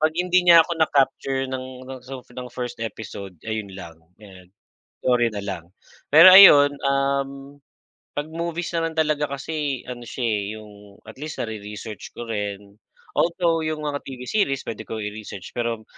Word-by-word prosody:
'Pag 155 +1 +1
hindi 180 +1 +3
niya 170 -1 +9
ako 170 - -5
na 160 - +4
capture 135 -1 +1
ng 130 0 -6
ng 130 0 -9
sof 130 0 -9 0.2
1st 120 -2 -6
episode, 100 -4 -7
ayun 110 -2 -3
lang, 85 -3 -9 0.2
'yan, 95 -4 -15 0.5
sorry 120 -2 +2
na 105 - -5
lang. 95 -4 -5 0.5
Pero 165 +5 +10
ayun, 145 -7 +9
um, 140 0 -1 0.6
'pag 145 +2 -3
movies 170 +1 -4
na 165 0 0
lang 160 - -10
talaga 150 -1 +1
kasi 140 -1 -3
ano 125 -1 -7
siya, 125 - -5
eh, 105 -3 0 0.2
yung 105 -1 -15
at 110 - -11
least 155 - -6
nare-research 105 -1 -7
ko 120 - -6
rin. 100 -2 -5 0.4
Although 170 -1 +1
yung 155 -1 -3
mga 145 -1 -3
TV 130 -2 -8
series 140 -10 0
puwede 110 - -5
kong 110 -1 -4
i-research, 105 -3 -8
pero 115 -2 -2
130 Hz, 165 wpm, -23 LUFS, 110-150 Hz, 0.6 s, Pero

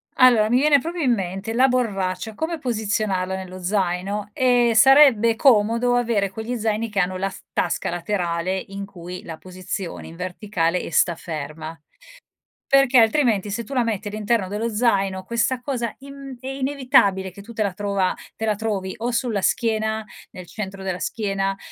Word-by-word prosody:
Allora 235 -4 +5
mi 245 - +4
viene 285 0 +5
proprio 335 +4 -4
in 250 - +4
mente: 195 +1 -4
la 260 +3 +5
borraccia, 210 -5 -1
come 320 +6 -3
posizionarlo 210 -7 -1
nello 185 -1 -7
zaino. 195 +2 -1
Ehm, 245 -1 +3
sarebbe 240 -3 +6
comodo 235 0 +3
avere 230 -5 +1
quegli 220 +5 -4
zaini 220 +1 -1
che 205 - -4
hanno 185 0 +1
la 195 +1 -2
s - - -12
tasca - - -1
laterale 175 0 -2
in 195 0 -6
cui 180 -2 -9
la 160 -1 -8
posizioni 185 0 -6
in 165 - -12
verticale 180 -1 -1
e - - -7
sta 170 - +3
ferma. 155 0 -7 0.9
Perché 275 -2 +5
altrimenti 225 -3 +3
se 230 +4 -3
tu 255 - -9
la 255 - +2
metti 215 -2 -2
all'interno 215 -1 0
dello 210 +4 -2
zaino, 195 -4 +1
questa 235 +4 0
cosa 245 -3 -3
in 275 -1 -10
è 260 - -9
inevitabile 260 -8 +2
che 200 - -12
tu 215 +4 -12
te 220 - 0
la 200 -3 -2
trova 200 -1 0 0.2
te 220 - -3
la 215 - +2
trovi 205 -3 -3
o 235 +2 -1
sulla 230 -4 -1
schiena, 220 0 0 0.3
nel 185 - -10
centro 195 0 -7
della 185 -2 -3
schiena, 195 +1 -2
210 Hz, 170 wpm, -22 LUFS, 190-240 Hz, 0.9 s, sarebbe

